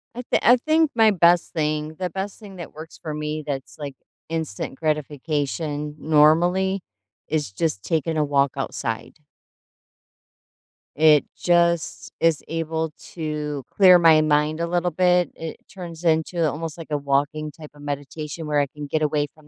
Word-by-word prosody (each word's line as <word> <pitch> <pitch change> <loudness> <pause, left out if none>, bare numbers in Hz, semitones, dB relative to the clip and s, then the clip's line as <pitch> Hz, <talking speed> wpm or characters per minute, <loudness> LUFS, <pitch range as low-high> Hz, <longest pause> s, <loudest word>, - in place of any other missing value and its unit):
I 245 - -4
thi - - +4
I 245 - +7
think 315 +4 +2
my 220 -2 +6
best 175 -2 +4
thing 155 -1 -2
the 180 - -1
best 195 +3 -5
thing 200 -3 -11
that 175 - -9
works 160 +1 -10
for 155 -2 -5
me 150 0 -3
that's, 135 -3 -5
like, 145 -3 -6 0.3
instant 160 -7 -4
gratification 150 0 -2
normally 175 +5 +3 0.5
is 150 -9 -1
just 120 -1 -2
taking 160 +3 -1
a 155 - +3
walk 140 -2 +2
outside. 115 -2 -4 1.8
It 150 -1 +5
just 170 -1 +1
is 165 -3 +3
able 160 -1 -2 0.2
to 150 -3 -3
clear 185 -3 +7
my 160 -2 +6
mind 155 +1 +1
a 170 - 0
little 175 +1 0
bit. 180 -1 +3
It 160 -1 -7
turns 175 -2 -9
into 160 0 +2
almost, 160 +2 -5
like, 165 - -8
a 150 - 0
walking 145 +2 -1
type 155 -1 -12
of 145 - -16
meditation 145 +2 -5
where 150 -1 +2
I 140 - +1
can 145 +2 -8
get 155 +2 -1
away 150 -1 +1
from 155 -1 -21
155 Hz, 160 wpm, -23 LUFS, 150-170 Hz, 1.8 s, I